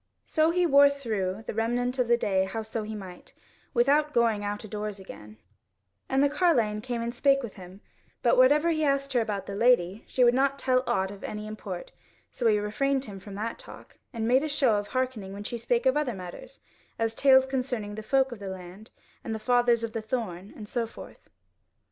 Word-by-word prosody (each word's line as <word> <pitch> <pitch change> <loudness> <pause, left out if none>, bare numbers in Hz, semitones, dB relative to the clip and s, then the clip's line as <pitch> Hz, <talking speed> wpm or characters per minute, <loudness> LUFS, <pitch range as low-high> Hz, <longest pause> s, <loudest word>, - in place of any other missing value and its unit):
So 315 +1 +2
he 355 +1 +2
wore 285 -2 +7
through 220 -8 -3
the - - -4
remnant 245 +3 -1
of 250 - +2
the 235 0 +4
day 190 -4 +1
howso 220 +1 -4
he 215 +1 -6
might, 185 -4 -10 0.4
without 285 +4 +2
going 230 -3 +2
out 205 +1 -4
adoors 210 -1 -5
again; 105 - -12 0.7
and 265 +1 +3
the - - +5
carline 265 -10 +1
came 235 0 -3
and 235 0 -3
spake 275 +2 +3
with 230 - -6
him; 185 +1 -12 0.4
but 240 - +4
whatever 295 +6 +5
he 310 -1 0
asked 275 -1 0
her 245 - +3
about 205 -3 -3
the 200 - -6
lady, 210 -3 +2
she 255 - +2
would 240 0 +6
not 275 +2 +2
tell 255 -2 +1
aught 190 0 0
of 200 0 -11
any 210 0 -5
import, 215 - -7 0.4
so 240 - -1
he 215 -2 +4
refrained 265 +6 0
him 200 -2 -9
from 195 +1 -10
that 220 +3 -4
talk, - - -13
and 225 -4 -3
made 255 +3 +4
a 310 - -2
show 265 -7 +2
of 205 0 -3
hearkening 250 -7 -3
when 200 +1 -7
she 235 +3 -5
spake 240 +2 0
of 260 +1 +4
other 290 -6 0
matters; 180 -2 -10 0.4
as 225 0 0
tales 265 +1 +5
concerning 250 -6 -3
the 220 - -6
folk 265 +4 +1
of 240 - -8
the 200 - -7
land, 190 +3 -10 0.3
and 225 - -3
the - - -2
Fathers 240 0 +2
of 225 -1 -4
the 225 - -3
Thorn, 210 -5 -4
and 210 - -9
so 235 0 -2
forth. - - -13
230 Hz, 210 wpm, -27 LUFS, 210-265 Hz, 0.7 s, wore